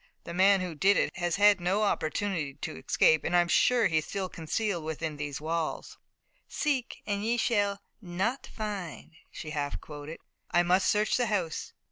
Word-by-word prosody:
The 170 - -7
man 190 +2 +5
who 180 -2 -4
did 195 +6 +3
it - - 0
has 175 -2 0
had 205 -1 +5
no 190 +5 +1
opportunity 160 -5 -1
to - - -6
escape, 155 - +3
and 175 - 0
I'm 175 0 +4
sure 240 +6 +3
that 200 - +2
he's 155 -1 +1
still 195 -2 -3
concealed 175 +2 -2
within 155 -1 -4
these 145 -1 -4
walls." 160 +1 -3 0.5
"Seek 275 -5 -2
and 205 -1 -2
ye 235 +2 +1
shall 205 -4 +1 0.2
not 195 +8 -2
find," 205 -7 -6 0.2
she 155 - -8
half 145 -2 -3
quoted. 150 +1 -9 0.3
"I 175 - +3
must 180 +2 +3
search 210 +1 +2
the 245 -2 +1
house." 185 -7 -2
180 Hz, 175 wpm, -29 LUFS, 160-205 Hz, 0.5 s, man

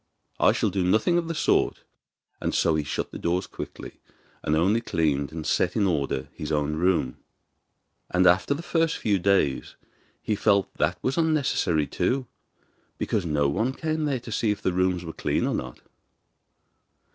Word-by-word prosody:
I - - +5
shall - - 0
do 95 -2 0
nothing 110 - +3
of 165 - -4
the 165 - -3
sort.' - - +1 0.6
And - - -1
so 80 - +3
he 80 -1 0
shut - - -3
the - - -7
doors 90 +2 0
quickly, - - -9 0.4
and 75 - 0
only 100 +8 +2
cleaned 75 -9 0
and 80 -1 -6
set 90 0 +1
in 105 - +2
order 70 -7 -1
his 75 - -6
own 75 0 0
room. 85 -7 +1 0.9
And 90 0 +2
after 95 +10 +4
the 165 - -7
first 165 -1 +1
few 100 -3 +1
days 90 -8 +1 0.5
he 110 - 0
felt 100 -1 +2
that - - +2
that - - -38
was 135 +6 0
unnecessary 140 - +1
too, 130 - -1 0.7
because 100 -5 -1
no 75 -2 +2
one 110 - 0
came 155 +1 -2
there 140 -4 0
to 115 - -9
see 110 0 0
if 105 - 0
the 95 - +1
rooms 90 -1 +1
where 80 - -6
clean - - -1
or - - 0
not. 60 -1 -5
95 Hz, 180 wpm, -26 LUFS, 80-120 Hz, 0.9 s, I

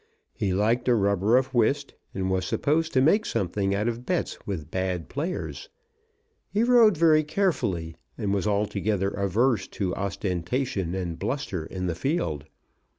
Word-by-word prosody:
He 105 -6 -1
liked 110 +6 +1
a 125 - +5
rubber 100 +2 +3
of 130 +1 0
whist, 135 +4 +1 0.2
and 95 -1 -2
was 95 0 +1
supposed 160 - 0
to 130 - +4
make 200 +10 +4
something 100 - -1
out 105 +3 0
of 120 +1 -2
bets 180 +4 -2
with 85 -6 -5
bad 95 -2 -2
players. 165 +7 -4 0.8
He 210 +2 +1
rode 235 -6 +5
very 155 -1 +5
carefully, 145 - -1 0.2
and 100 -1 -1
was 100 +1 0
altogether 105 -1 0
averse 105 +5 +1
to 95 -3 -1
ostentation 95 0 -2
and 85 -3 -4
bluster 95 - -3
in 90 -1 -4
the 90 - 0
field. 85 - -2
105 Hz, 150 wpm, -26 LUFS, 95-140 Hz, 0.8 s, a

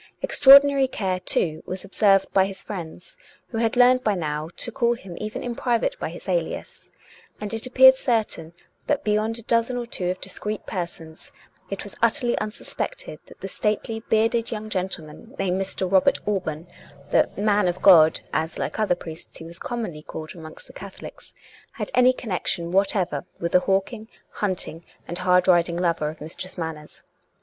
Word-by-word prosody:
Extraordinary 275 0 +7
care, 190 -7 -2
too, 160 -3 +1
was 185 +1 -5
observed 195 -1 +3
by 190 0 +4
his 195 -1 -7
friends, 190 - -8 0.3
who 225 - -3
had 230 +1 0
learned 255 +1 +5
by 210 -2 +1
now 155 -2 -3
to 235 - +3
call 240 -1 +1
him 190 -6 -10
even 215 +5 -5
in 245 - -3
private 240 - 0
by - - -3
his - - -11
alias; - - -3 0.5
and 210 +1 -4
it 225 +2 0
appeared 260 +1 +8
certain 220 -10 -1 0.3
that - - 0
beyond 215 +2 0
a 235 - -8
dozen 235 +2 +1
or 240 - -3
two 180 -6 -2
of 185 - -3
discreet 210 +2 -4
persons 170 -4 -7 0.4
it - - -4
was - - -6
utterly 245 -6 +3
unsuspected - - -4
that - - -16
the - - -4
stately 220 +1 -2
bearded 225 +1 +2
young 215 -1 -5
gentleman 185 - -5
named 190 0 0
Mr. 190 -1 -3
Robert 190 -1 +4
Alban 170 -6 -2 0.2
— 140 -1 -22
the - - +3
" - - -23
man 205 -1 +2
of 175 +1 -3
God," 165 -5 +7
as, 160 +1 -1
like - - -4
other 210 -5 +2
priests, 160 -1 -10
he - - -10
was 170 +1 -8
com 240 -1 -4
monly 150 -5 -8
called 155 0 -8
amongst 160 -3 -11
the - - -16
Catholics 195 0 -11 0.2
— - - -25
had - - -4
any 250 0 +5
connection 185 -7 -3
whatever 190 -6 +1
with 170 0 -2
the 180 - +5
hawking, 195 +4 -1 0.2
hunting, 180 -4 -3 0.2
and 175 +1 -3
hard 180 0 +3
riding 175 -1 +3
lover 170 -4 0
of 155 0 -11
Mistress 170 +5 -7
Manners. 160 -3 -7
195 Hz, 180 wpm, -24 LUFS, 170-230 Hz, 0.5 s, appeared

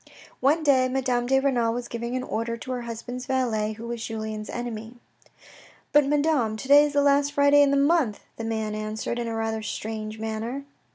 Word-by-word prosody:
One 300 +5 +2
day 260 -3 +4
Madame 250 -2 0
de 265 +1 +4
Renal 240 -4 +1
was 245 0 -4
giving 235 +1 -4
an 255 - -2
order 230 0 -3
to 255 - -7
her 250 -1 -2
husband's 240 +2 -6
valet 225 -5 0
who 225 +2 -9
was 235 -1 -4
Julien's 215 -1 -5
enemy. 235 -1 -5 0.5
" - - -22
But, 295 -1 +5
Madame, 285 -7 +1
to 260 - -7
day 290 +1 +8
is 295 - -3
the 285 0 +3
last 285 0 +3
Friday 285 0 +5
in 285 - +5
the 280 - +2
month," 280 -6 +2
the 225 - -6
man 220 -1 -2
answered 215 +2 -3
in 235 - -2
a 225 - -3
rather 225 0 -2
strange 215 0 -5
manner. 225 +5 -4
240 Hz, 205 wpm, -25 LUFS, 220-275 Hz, 0.5 s, day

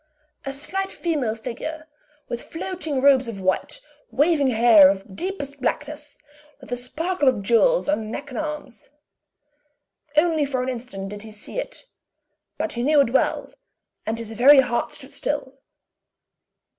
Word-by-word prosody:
A - - -1
slight 385 +8 -3
female 290 -10 -1
figure, 305 +8 -6 0.4
with 240 - -4
floating 325 -5 -4
robes 270 -3 +5
of 220 -4 -6
white, 185 0 -1 0.3
waving 290 0 +3
hair 225 -5 +7
of 195 0 -4
deepest, 285 - -5
blackness, 290 +3 -3 0.4
with 260 -3 -14
a - - +1
sparkle 300 +6 -2
of 235 -6 +2
jewels 370 - +3
on 225 -8 -1
neck 280 +5 -6
and 255 - -4
arms. 300 -8 -6 1.3
Only 320 -1 +3
for 265 -3 -1
an 255 - -2
instant 230 -6 -6
did 205 0 -8
he 220 0 -10
see 215 - -6
it; - - -6 0.7
but - - -2
he 240 - -3
knew 295 +4 +4
it 235 - 0
well, 265 - 0 0.5
and 225 +1 -2
his 225 -1 -6
very 265 +5 +7
heart 240 -2 -1
stood 270 +2 -10
still. 280 -1 -3
265 Hz, 150 wpm, -23 LUFS, 230-300 Hz, 1.3 s, hair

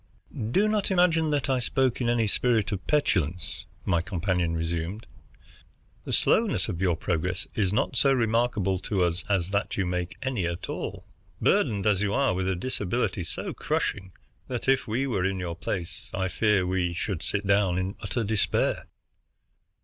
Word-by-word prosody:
"Do 195 - +3
not 215 -2 +1
imagine 170 -4 +3
that 145 -3 0
I 130 -2 +2
spoke 130 +1 0
in 120 - +1
any 120 -1 +2
spirit 115 0 +1
of 95 -3 -4
petulance," 90 - 0 0.2
my 85 -3 +2
companion 90 -2 -1
resumed. 85 +5 -3 1.0
"The - - -4
slowness 225 -2 +2
of 90 -5 -4
your 90 -3 +3
progress 90 +2 -1
is 100 -4 +1
not 105 - 0
so 135 - +4
remarkable 115 -6 +1
to 95 0 0
us 85 0 0
as 95 -2 +1
that 100 +1 -1
you 95 - +1
make 90 +1 -3
any 125 -10 -1
at 85 0 -5
all, - - -5 0.3
burdened 100 -3 +2
as 105 -2 +3
you 105 0 +1
are 135 -7 +3
by 95 +1 -1
a 95 - +1
disability 105 0 -1
so - - -4
crushing 95 -1 -2 0.4
that 125 0 -4
if 135 -1 +3
we 120 +5 0
were 105 -9 0
in 95 0 0
your 85 -2 -3
place 85 +1 -5
I 95 0 0
fear 100 0 +2
we 90 -1 0
should 90 -1 -3
sit 100 +3 -2
down 100 -2 +3
in 95 +2 -2
utter 115 +4 -2
despair." 110 -1 0
100 Hz, 170 wpm, -27 LUFS, 90-120 Hz, 1.0 s, so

